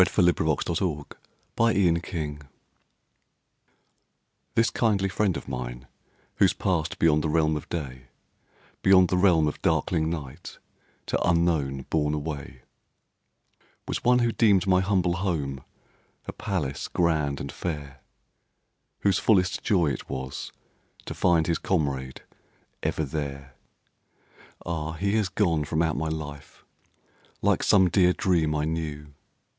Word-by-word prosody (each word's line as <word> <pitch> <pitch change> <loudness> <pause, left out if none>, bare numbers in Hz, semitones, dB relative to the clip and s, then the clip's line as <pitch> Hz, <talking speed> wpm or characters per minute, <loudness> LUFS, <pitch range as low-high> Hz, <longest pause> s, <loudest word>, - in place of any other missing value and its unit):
LORD 90 - +5
BYRON. 80 -3 +1
THE 80 -4 -1 0.5
PASSING 110 -5 +3
OF 85 0 0
A 85 -4 -3
DOG 75 -1 -8 2.1
This 115 +1 +3
kindly 100 -4 +1
friend 95 -1 0
of - - -9
mine 60 -1 -5 0.5
who's - - +4
passed 85 -4 -1
Beyond 75 -2 +3
the 80 - 0
realm 80 0 +2
of 75 - -6
day, 65 -6 -5 0.7
Beyond 95 -2 +5
the 90 - +1
realm 90 -4 +4
of 75 - -4
darkling 80 -3 +1
night, 75 -6 -7 0.5
To - - -1
unknown 80 -6 +1
bourne 75 -1 +1
away 70 -4 -6 1.2
Was - - -3
one 125 0 +5
who 120 -1 +2
deemed 100 -6 +3
my 95 -1 +3
humble 95 -3 +1
home 75 -8 -2 0.6
A - - -6
palace 90 -11 -3
grand 75 -5 0
and 70 - -5
fair; 70 -5 -5 1.0
Whose 100 -3 +2
fullest 95 -4 +2
joy 85 -8 +2
it - - -6
was 65 0 -5 0.5
to - - -5
find 85 -3 +2
His 85 0 0
comrade 70 -7 -2 0.6
ever 80 - -1
there. 70 -2 -5 1.1
Ah! 80 -2 -3
He 100 +5 -1
has 105 -4 0
gone 85 -7 +1
from 80 +2 0
out 80 -3 0
my 80 +3 -2
life 75 -3 -7 0.8
Like - - +3
some 95 -2 +5
dear 90 +1 +4
dream 80 -6 +1
I 75 0 0
knew. 75 -2 -4
80 Hz, 135 wpm, -26 LUFS, 75-90 Hz, 2.1 s, LORD